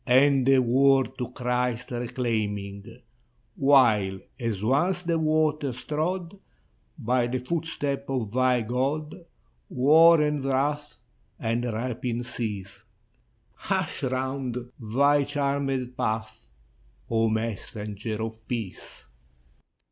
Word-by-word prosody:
And 135 +1 +4
the 135 0 +6
world 130 +1 +3
to 125 -1 -3
Christ 125 -1 -2
reclaiming: 110 -5 -2 0.7
While, 115 -9 +4 0.2
as 115 -5 -2
once 170 +10 +2
the 170 -1 0
waters 155 -4 0
trod 175 +5 -2 0.6
By 125 -2 +1
the 125 +1 -1
footsteps 140 0 -3
of 125 -6 -2
thy 125 -1 +2
God, 135 +6 -1 0.6
War 160 +6 +6
and 150 -2 0
wrath 145 +2 -1 0.4
and 115 +2 -1
rapine 120 +1 -3
cease, 105 -5 -5 0.7
Hush'd - - -2
round 130 -2 -3
thy 140 +6 +3
charmed 140 -3 -1
path, 110 -3 -3 0.6
O 115 -1 +2
Messenger 110 0 -4
of 110 -1 -7
Peace! 115 -6 -6
125 Hz, 100 wpm, -26 LUFS, 115-140 Hz, 0.7 s, the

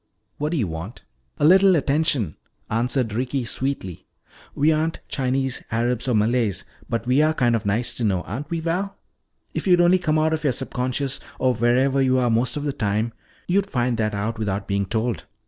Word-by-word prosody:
"What 150 +1 -1
do 170 - 0
you 120 - +1
want?" 85 +6 -7 0.3
"A - - +2
little 190 +3 +6
attention," 140 - +1 0.4
answered 120 0 0
Ricky 125 +2 -1
sweetly. 115 - -4 0.5
"We 150 +3 +3
aren't 160 +1 0
Chinese, 135 0 -1
Arabs, 120 +2 0
or 125 - +2
Malays, 110 -1 +1 0.3
but 115 0 -2
we 130 +4 +3
are 155 +1 +2
kind 120 -4 +2
of 105 -3 -2
nice 110 +5 +1
to 120 - -2
know, 95 -4 +1
aren't 135 +10 -6
we, 165 -1 -2
Val? 185 +4 -2 0.6
If - - -3
you'd 180 -1 +5
only 175 +2 +5
come 155 -3 +1
out 160 +1 +2
of 160 0 -2
your 140 -4 +2
subconscious, 130 +1 -2 0.2
or 130 -1 +2
wherever 125 +4 +2
you 130 -1 +3
are 125 -2 +2
most 120 +3 +1
of 145 - -3
the 145 -2 -1
time, 110 -2 -1 0.3
you'd 195 +2 +1
find 120 - 0
that 110 -1 0
out 110 +3 -3
without 100 -2 -2
being 100 -1 0
told." 110 -3 -2
125 Hz, 195 wpm, -23 LUFS, 115-150 Hz, 0.6 s, little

